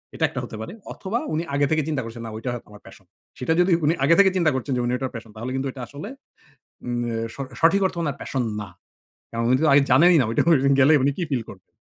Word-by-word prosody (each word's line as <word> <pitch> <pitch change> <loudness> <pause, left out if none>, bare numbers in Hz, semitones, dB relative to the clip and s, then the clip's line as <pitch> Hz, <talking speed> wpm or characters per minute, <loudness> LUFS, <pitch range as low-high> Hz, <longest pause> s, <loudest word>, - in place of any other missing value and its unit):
এটা - - -3
একটা - - -5
হতে - - -8
পারে 145 - -7 0.2
অথবা 210 +5 -3
উনি 160 +2 0
আগে 145 0 +3
থেকে 155 0 +2
চিন্তা 150 -4 -1
করছেন, 115 0 -8
না - - -5
ওইটা 125 +3 -4
হ - - -3
আমার 105 0 -14
প্যাশন। 95 - -15 0.3
সেটা 145 +6 +1
যদি 180 +1 +3
উনি 160 - +3
আগে 165 +4 +5
থেকে 195 -1 +7
চিন্তা 165 -4 +3
করছেন 130 +2 -3
যে - - 0
উনি 120 - 0
ওটার 130 -1 -4
প্যাশন 110 -1 -9
তাহলে 120 +4 -5
কিন্তু 135 +1 -2
এটা 130 - -9
আসলে 145 - -8 0.8
উম 120 0 -2
এ - - -3 0.2
স - - -14 0.2
সঠিক 180 +5 +4
অর্থে 180 - -5
উনার 145 -3 -2
প্যাশন 130 -2 -2 0.2
না। 100 - -7 0.6
কারণ 115 0 -2
উনি 130 - +5
তো - - +4
আগে 140 - +7
জানেনই 170 +6 +6
না - - +1
ওইটা 115 - +1 0.4
গেলেই 145 +3 +6
উনি 140 - +3
কি 180 - -1
ফিল 120 -4 0
করবেন। 95 -2 -14
140 Hz, 255 wpm, -23 LUFS, 120-165 Hz, 0.8 s, থেকে